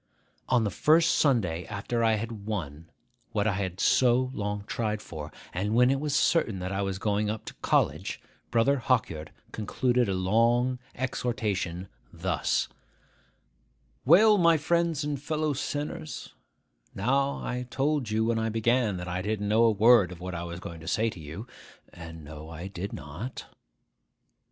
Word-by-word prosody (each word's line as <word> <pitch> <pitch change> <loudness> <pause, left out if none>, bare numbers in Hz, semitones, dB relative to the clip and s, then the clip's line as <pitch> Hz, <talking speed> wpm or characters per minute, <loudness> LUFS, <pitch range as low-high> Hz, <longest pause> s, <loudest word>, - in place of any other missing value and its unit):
On 125 -3 +3
the 105 - -1
first 160 - +4
Sunday 95 - +2
after 105 +3 -2
I 110 -1 +4
had 110 -1 -4
won 85 -6 -4 0.4
what 105 -1 +1
I 110 - +2
had 95 -1 -3
so 125 0 +3
long 105 -2 -3
tried 110 -2 -2
for, 75 -6 -8 0.2
and 105 +4 -1
when 125 +2 +5
it 135 - +1
was 145 -1 -1
certain 135 - +2
that 90 +1 -4
I 100 0 -1
was 95 -1 -2
going 105 +1 0
up 110 0 -4
to - - -7
college, 80 +8 +1 0.3
Brother 125 +4 +3
Hawkyard 110 - 0 0.2
concluded 120 +2 0
a 95 - 0
long 115 +7 +2 0.2
exhortation 105 -8 -2 0.2
thus: - - 0 1.4
'Well, 210 +7 +6
my 170 -2 +5
friends 165 0 +1
and 145 -2 -3
fellow 155 0 -1
sinners, 145 - -4 0.6
now 135 +7 +1
I 125 0 -4
told 140 -2 0
you 110 +1 +1
when 115 0 +1
I 110 0 0
began, 115 -2 +1
that 90 0 -6
I 90 +1 -2
didn't 105 +1 -2
know 110 +2 +5
a - - +6
word 110 -2 +5
of 90 - -9
what 90 +1 -5
I 85 -1 -4
was 85 0 -6
going 85 -2 -8
to 80 - -11
say 110 +1 +1
to 90 - -11
you 80 +8 -7 0.5
(and 80 -2 -10
no, 75 +1 -9
I 80 +2 -7
did 100 +1 -5
not!) 80 - -7
110 Hz, 165 wpm, -28 LUFS, 95-125 Hz, 1.4 s, Well